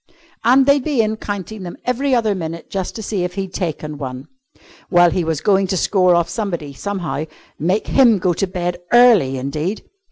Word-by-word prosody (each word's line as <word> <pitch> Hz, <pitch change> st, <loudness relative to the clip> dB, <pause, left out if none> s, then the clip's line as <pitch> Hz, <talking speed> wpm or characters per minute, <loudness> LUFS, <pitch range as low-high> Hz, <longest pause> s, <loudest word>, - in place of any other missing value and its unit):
And 260 Hz, +4 st, +5 dB
they'd 280 Hz, -1 st, +3 dB
be 275 Hz, -6 st, +1 dB
in 215 Hz, 0 st, -2 dB
counting 205 Hz, 0 st, -6 dB
them 175 Hz, -2 st, -7 dB
every 260 Hz, +2 st, +1 dB
other 220 Hz, -3 st, +1 dB
minute 165 Hz, -3 st, -6 dB
just 190 Hz, -2 st, -3 dB
to 220 Hz, -, -6 dB
see 195 Hz, -3 st, -2 dB
if 180 Hz, 0 st, -4 dB
he'd 190 Hz, -2 st, -4 dB
taken 155 Hz, -4 st, -4 dB
one. 130 Hz, -1 st, -6 dB, 0.6 s
Well, 175 Hz, -2 st, +5 dB
he 180 Hz, -, 0 dB
was 160 Hz, -2 st, -2 dB
going 195 Hz, -1 st, +2 dB
to 190 Hz, 0 st, -1 dB
score 185 Hz, -1 st, +3 dB
off 170 Hz, -1 st, +2 dB
somebody, 170 Hz, -8 st, -4 dB
somehow. 175 Hz, -2 st, -4 dB, 0.3 s
Make 180 Hz, +7 st, 0 dB
him 240 Hz, -6 st, +4 dB
go 180 Hz, -1 st, +1 dB
to 195 Hz, -, -1 dB
bed 175 Hz, -1 st, -3 dB
early 225 Hz, -, +5 dB
indeed! 150 Hz, +10 st, -3 dB
185 Hz, 190 wpm, -19 LUFS, 170-220 Hz, 0.6 s, And